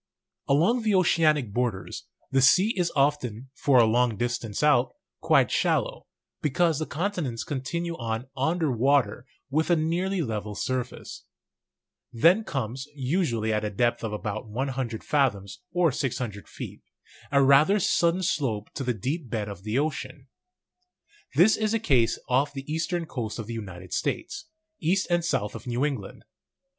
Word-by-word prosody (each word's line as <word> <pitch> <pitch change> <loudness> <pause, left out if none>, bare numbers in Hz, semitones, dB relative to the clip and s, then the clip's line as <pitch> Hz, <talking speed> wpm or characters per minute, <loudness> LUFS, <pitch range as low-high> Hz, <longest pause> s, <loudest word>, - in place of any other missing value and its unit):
Along 175 - +3
the 215 -3 +2
oceanic 155 - +3
borders, 120 -5 -2 0.3
the 135 0 +3
sea 185 - +5
is 175 -3 0
often, 135 -4 0
for 140 -2 +2
a 120 - +7
long 115 0 +2
distance 120 0 -2
out, 130 -4 +3 0.2
quite - - +3
shallow, - - 0 0.3
because 160 +1 +1
the 155 - -3
continents 160 - -2
con 140 -4 -4
tinue 170 +4 -3
on 115 +1 -3
under 160 +2 0
water 125 -1 +1 0.2
with 155 +4 +1
a 175 - +5
nearly 175 +3 0
level 105 -4 -4
surface; 130 +2 -4 0.9
then 170 - +4
comes, 130 - -4
usually 130 - 0
at 105 0 0
a 105 - -1
depth 120 +4 0
of 110 - -2
about 105 +1 -4
100 125 -1 -3
fathoms, 100 -10 0
or 175 -3 +3
600 120 -6 -3
feet, - - -8 0.5
a 140 -1 +4
rather 145 +10 +5
sudden 175 0 +2
slope 125 - -1
to 135 - -4
the 125 -2 -1
deep 135 - -3
bed 110 -2 -2
of 100 -3 -8
the 110 +4 -2
ocean. 135 -3 -3 1.1
This 195 +6 +6
is 215 0 0
the 225 - +2
case 125 - +2
off 135 +3 +1
the 135 -1 -6
eastern 165 +2 -2
coast 115 -8 -5
of 115 - -5
the 115 - -6
United 95 -5 -7
States, 325 -2 -2 0.3
east 185 +4 +1
and 175 0 +2
south 105 -11 -1
of 115 +3 -9
New 125 +3 0
England. 130 -10 -5
135 Hz, 155 wpm, -26 LUFS, 115-165 Hz, 1.1 s, a